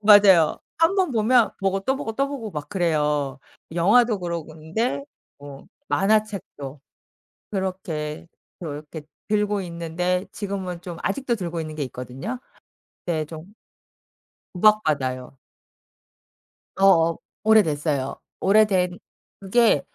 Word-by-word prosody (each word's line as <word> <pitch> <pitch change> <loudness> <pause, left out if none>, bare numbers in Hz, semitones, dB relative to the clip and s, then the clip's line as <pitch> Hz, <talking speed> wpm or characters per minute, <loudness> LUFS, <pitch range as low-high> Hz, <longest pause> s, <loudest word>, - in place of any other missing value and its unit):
맞아요. 200 -6 +7 0.2
1 330 +3 +4
번 370 -8 +2
보면 230 +1 +4
보고 195 0 +1
또 265 +7 0
보고, 225 - -4
또 275 +4 0
보고 265 -6 -5
막 150 -4 -6
그래요. 150 -7 0 0.3
영화도 210 +6 +4
그러고 170 -3 -4
근데 160 - -2 0.3
뭐 140 -1 -11 0.2
만화책도 195 -9 0 0.7
그렇게 170 -6 -3 0.3
그렇게 150 -1 -7 0.3
들고 210 -1 +1
있는데 180 +2 -2
지금은 190 -4 -4
좀 175 -2 -7
아직도 240 +3 0
들고 170 -4 -4
있는 155 -1 -6
게 150 - -2
있거든요. 130 - -6 0.7
네 160 -3 0
좀 160 +5 -10 1.0
구박받아요. 145 -11 +2 1.4
어어 170 -4 +5 0.3
오래됐어요. 150 -10 +2 0.2
오래된 190 -3 +3 0.4
그게 200 - +3
180 Hz, 230 characters per minute, -24 LUFS, 155-210 Hz, 1.4 s, 맞아요